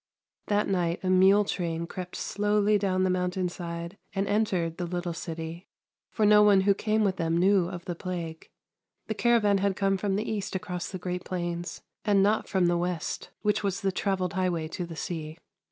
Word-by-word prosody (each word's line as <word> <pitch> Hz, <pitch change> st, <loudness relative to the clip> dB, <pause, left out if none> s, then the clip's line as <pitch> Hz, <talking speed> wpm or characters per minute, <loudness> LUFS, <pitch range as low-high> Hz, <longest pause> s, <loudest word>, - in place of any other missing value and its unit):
That 205 Hz, 0 st, +2 dB
night 175 Hz, -3 st, 0 dB
a 185 Hz, -, +1 dB
mule 190 Hz, +3 st, +6 dB
train 170 Hz, -3 st, -2 dB
crept 180 Hz, +1 st, -7 dB
slowly 210 Hz, 0 st, +1 dB
down 185 Hz, -2 st, +1 dB
the 185 Hz, -, +2 dB
mountain 180 Hz, 0 st, 0 dB
side 170 Hz, +1 st, -6 dB, 0.2 s
and 195 Hz, +1 st, 0 dB
entered 190 Hz, -6 st, 0 dB
the 175 Hz, -, -3 dB
little 175 Hz, 0 st, -3 dB
city, 165 Hz, +1 st, -6 dB, 0.4 s
for 215 Hz, -, +1 dB
no 210 Hz, 0 st, +7 dB
one 205 Hz, -2 st, +6 dB
who 200 Hz, +1 st, +4 dB
came 215 Hz, +2 st, +1 dB
with 190 Hz, -2 st, +1 dB
them 165 Hz, -1 st, 0 dB
knew 190 Hz, 0 st, +4 dB
of 175 Hz, -1 st, -7 dB
the 180 Hz, -, -3 dB
plague. 170 Hz, -2 st, -6 dB, 0.6 s
The 220 Hz, -, -2 dB
cara 235 Hz, +2 st, +3 dB
van 200 Hz, -1 st, +3 dB
had 195 Hz, 0 st, +1 dB
come 195 Hz, 0 st, +1 dB
from 195 Hz, 0 st, -1 dB
the 215 Hz, +3 st, -2 dB
east 205 Hz, -2 st, -3 dB
across 180 Hz, 0 st, -4 dB
the 190 Hz, -, -4 dB
great 180 Hz, 0 st, -4 dB
plains, 175 Hz, -1 st, -4 dB, 0.2 s
and 200 Hz, -2 st, +4 dB
not 210 Hz, +2 st, +2 dB
from 190 Hz, -3 st, +2 dB
the 175 Hz, 0 st, +2 dB
west, 175 Hz, -2 st, -3 dB
which 210 Hz, -1 st, +2 dB
was 195 Hz, -2 st, -1 dB
the 195 Hz, -1 st, +1 dB
travelled 185 Hz, -1 st, -1 dB
highway 180 Hz, -4 st, 0 dB
to 175 Hz, +1 st, -4 dB
the 165 Hz, -, -8 dB
sea. 160 Hz, -1 st, -5 dB
185 Hz, 200 wpm, -28 LUFS, 175-200 Hz, 0.6 s, no